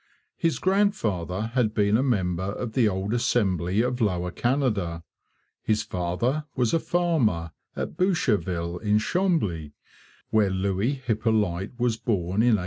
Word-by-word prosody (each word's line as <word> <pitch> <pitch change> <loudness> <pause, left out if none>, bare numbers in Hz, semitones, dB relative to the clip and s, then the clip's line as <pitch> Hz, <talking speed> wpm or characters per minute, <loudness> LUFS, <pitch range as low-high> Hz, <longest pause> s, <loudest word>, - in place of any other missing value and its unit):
His 165 -1 0
grandfather 110 - 0
had 115 -4 +1
been 105 0 +3
a 120 - +3
member 95 -7 0
of 120 -3 -4
the 120 -3 +3
old 95 +2 -2
Assembly 100 -5 +1
of 125 0 -2
Lower 90 -4 0
Canada; 105 - 0 0.6
his 110 -1 +1
father 105 - -1
was 125 -4 +1
a 165 - +4
farmer 140 - +1 0.2
at - - -4
Boucherville 95 - 0
in 105 -1 +2
Chambly, 105 - 0 0.6
where 105 -2 +3
Louis 95 +6 0
Hippolyte 110 -5 -1
was 120 -2 +1
born 100 -3 0
in 120 -1 +5
1804. - - -4
110 Hz, 135 wpm, -26 LUFS, 90-125 Hz, 0.6 s, in